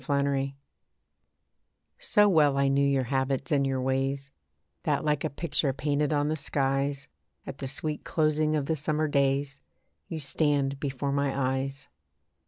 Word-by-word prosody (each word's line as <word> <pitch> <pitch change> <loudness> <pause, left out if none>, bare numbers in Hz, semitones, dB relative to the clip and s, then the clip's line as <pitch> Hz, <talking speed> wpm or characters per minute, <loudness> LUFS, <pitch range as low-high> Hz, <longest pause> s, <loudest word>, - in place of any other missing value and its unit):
ESTRANGED 140 0 0 1.4
So 210 0 +4
well 150 -7 +4
I 140 0 +3
knew 140 +1 +2
your 140 -1 +2
habits 135 +1 -1
and 140 -2 +3
your 135 -1 -1
ways, 135 +1 -1 0.5
That - - 0
like 150 -1 +1
a 155 - 0
picture 140 -2 0
painted 145 +1 0
on 145 -1 +1
the 155 - 0
skies, 140 -1 -1 0.4
At 135 - -8
the 135 - -4
sweet 150 +3 -2
closing 155 -1 +1
of 145 -2 0
the 160 - 0
summer 155 +1 -1
days, 140 -1 +1 0.5
You 165 - -5
stand 140 -2 0
before 140 0 -2
my 135 -2 0
eyes. 135 +1 -6
140 Hz, 150 wpm, -28 LUFS, 135-150 Hz, 1.4 s, So